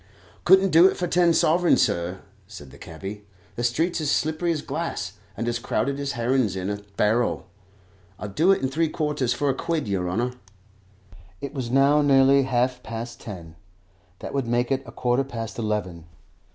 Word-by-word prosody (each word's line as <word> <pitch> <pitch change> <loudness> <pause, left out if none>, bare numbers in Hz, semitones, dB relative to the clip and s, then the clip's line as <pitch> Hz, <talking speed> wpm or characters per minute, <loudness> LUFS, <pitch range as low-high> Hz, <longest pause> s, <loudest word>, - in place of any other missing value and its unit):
"Couldn't 190 +1 +5
do 165 +4 +7
it - - -1
for 180 - -1
ten 175 0 +3
sovereigns, 170 +2 +3
sir," 85 +2 -2 0.3
said 75 -10 -11
the - - -14
cabby. 95 +6 -8 0.3
"The 120 - -3
streets 160 +8 0
is 155 - -2
as - - +3
slippery 155 +3 -1
as 155 -3 -2
glass, - - -4 0.2
and 115 - -3
as 120 0 -1
crowded 135 +5 -1
as 140 0 -2
herrin's 120 -3 0
in 95 +1 -3
a 100 0 -5 0.2
barrel. 115 +3 +1 0.7
I'll 105 - -6
do 155 - +1
it 195 - +1
in - - +2
three 160 +3 0
quarters 150 -6 -1
for 145 +4 0
a 135 - +3
quid, 165 -1 -2
yer 95 -3 -1
honour." 120 +7 -1 1.1
It 140 - -6
was 130 -5 -4
now 140 +3 +4
nearly 135 -1 +5
half 125 -1 0
past 115 +1 -7
ten; 85 -6 -9 0.6
that - - -8
would 135 -4 -1
make 120 +2 0
it 135 0 +1
a - - -9
quarter 125 +3 0
past 115 -5 -6
eleven. 95 -7 -3
125 Hz, 185 wpm, -24 LUFS, 110-150 Hz, 1.1 s, do